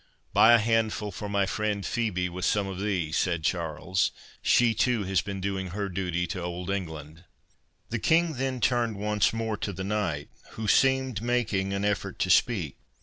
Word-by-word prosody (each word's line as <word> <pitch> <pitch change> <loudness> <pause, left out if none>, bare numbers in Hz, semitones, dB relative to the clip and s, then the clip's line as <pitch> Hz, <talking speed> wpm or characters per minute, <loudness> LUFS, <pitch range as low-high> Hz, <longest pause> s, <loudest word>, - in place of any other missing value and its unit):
"Buy 115 - +7
a - - +8
handful 110 -2 0
for 105 +3 -6
my 100 -1 +2
friend 105 -1 -2
Phœbe 100 -7 -1
with 90 +1 -6
some 100 +1 +2
of 95 -1 -5
these," 90 -6 -1
said 85 -3 0
Charles, 80 +2 0 0.3
"she 120 -2 +4
too 115 0 +1
has 95 -2 +1
been 100 0 -5
doing 95 0 -2
her 100 +2 -3
duty 90 -1 -1
to 90 0 -5
Old 90 +2 -4
England." 80 -4 -5 0.7
The 115 - -1
King 165 +6 +3
then 130 -1 -2
turned 120 -1 +1
once 105 -1 +1
more 115 -1 -2
to 100 - -3
the 95 0 -5
knight, 95 -8 -2 0.2
who 110 -1 -4
seemed 130 -2 +3
making 110 -5 0
an 100 +1 -1
effort 100 -2 -1
to 95 - +1
speak. 90 - +2
100 Hz, 180 wpm, -27 LUFS, 90-110 Hz, 0.7 s, a